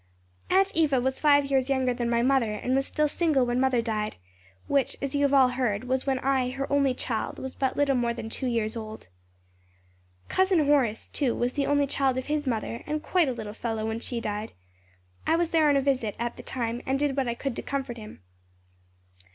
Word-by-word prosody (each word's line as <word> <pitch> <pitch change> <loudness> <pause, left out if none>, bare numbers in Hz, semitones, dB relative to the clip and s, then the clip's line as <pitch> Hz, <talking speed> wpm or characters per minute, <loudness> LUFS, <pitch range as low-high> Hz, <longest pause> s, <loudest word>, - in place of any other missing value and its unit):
"Aunt 390 +1 +3
Eva 295 -5 +3
was 265 +1 -1
five 285 -2 +5
years 270 -1 +1
younger 260 -2 +1
than 240 -1 -2
my 235 0 +2
mother 255 -4 +2
and 245 +4 -2
was 270 +1 +1
still 305 -1 +1
single 295 -4 +2
when 240 +1 0
mother 255 -3 +2
died; 215 -2 -2 0.5
which, 280 -2 +1
as 275 -1 -3
you 285 - +1
have 280 -1 +3
all 270 -2 +6
heard, 245 -4 -1
was 260 +2 -1
when 265 -1 +2
I, 260 -1 +1
her 270 +2 -3
only 275 -2 +3
child, 230 -3 -3
was 265 0 -6
but 265 -1 -1
little 285 -1 +3
more 240 -1 +1
than 235 -1 -5
two 255 +3 -4
years 230 -2 -1
old. 220 - -8 1.2
"Cousin 375 -5 +2
Horace, 265 -7 +2
too, 265 -5 -1
was 245 +1 -1
the 280 -2 -1
only 285 0 +3
child 270 -2 0
of 260 - -3
his 295 -1 -2
mother, 230 -1 -2
and 305 0 -2
quite 350 -6 +2
a - - -1
little 215 -3 -6
fellow 225 -1 -3
when 220 +1 -2
she 240 0 -4
died. 210 -1 -4 0.7
I 325 - +4
was 340 0 0
there, 315 -2 +4
on 285 - +4
a - - +2
visit, 260 -6 0
at 235 +1 -3
the - - -9
time 235 -1 -3
and 265 +1 +1
did 285 -1 0
what 270 -2 0
I 235 - -1
could 270 0 -3
to - - -2
comfort 270 -4 -4
him. 215 - -11
260 Hz, 220 wpm, -27 LUFS, 235-280 Hz, 1.2 s, all